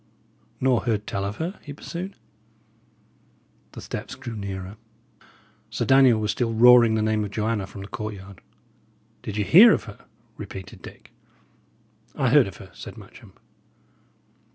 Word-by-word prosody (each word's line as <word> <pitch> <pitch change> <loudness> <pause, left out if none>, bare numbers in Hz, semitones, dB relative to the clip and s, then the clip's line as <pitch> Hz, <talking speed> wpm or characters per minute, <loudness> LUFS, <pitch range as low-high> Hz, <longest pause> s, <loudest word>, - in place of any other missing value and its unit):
"Nor 130 -2 +1
heard 105 -3 -1
tell 100 -1 -3
of 100 +1 -4
her?" 170 - -5
he 145 - -9
pursued. 175 +6 -7 1.6
The - - -9
steps - - -7
drew 120 -3 -8
nearer. 95 -1 -6 0.9
Sir - - -3
Daniel 130 -4 +5
was 105 0 0
still 115 -2 -2
roaring 120 -1 +7
the 110 - 0
name 110 0 0
of 105 - -4
Joanna 105 -1 -2
from 100 0 -10
the 100 - -8
courtyard. 100 -3 -8 0.8
"Did 105 - -6
ye 105 - +1
hear 205 - +8
of - - -1
her?" 105 -4 -12 0.3
repeated 95 -1 -9
Dick. - - -13 1.0
"I 135 -4 +1
heard 140 -4 +5
of 95 - -10
her," 95 - -13
said - - -10
Matcham. - - -15
110 Hz, 150 wpm, -24 LUFS, 100-130 Hz, 1.6 s, hear